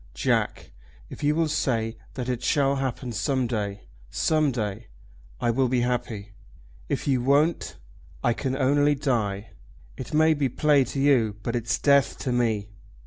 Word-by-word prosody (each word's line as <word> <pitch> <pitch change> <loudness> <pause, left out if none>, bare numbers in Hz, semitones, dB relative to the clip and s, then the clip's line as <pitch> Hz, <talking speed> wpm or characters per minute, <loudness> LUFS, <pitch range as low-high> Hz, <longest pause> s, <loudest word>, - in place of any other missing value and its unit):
Jack, - - -1 0.4
if - - -9
you 150 +1 +2
will 165 0 +2
say 115 -6 -1 0.2
that 125 -2 -4
it 125 -2 -2
shall 140 +1 +2
happen 130 -2 -3
some 130 +4 0
day, 105 -4 -3 0.3
some 155 -2 +1
day, 110 -2 -4 0.5
I 120 - +1
will 130 +2 +1
be 125 0 +1
happy. 115 -4 -3 0.6
If - - -2
you 130 -3 +2
won't, 145 +6 +1 0.5
I 120 - +3
can 130 +2 -3
only 145 +2 +3
die. 110 -7 -2 0.5
It - - -7
may 155 +1 +4
be 145 -3 0
play 145 +1 +3
to 135 - -5
you, 125 -7 +3
but 115 +1 -2
it's 115 -2 0
death 140 -2 +3
to 130 - -2
me." 110 -4 0
125 Hz, 160 wpm, -25 LUFS, 115-140 Hz, 0.6 s, may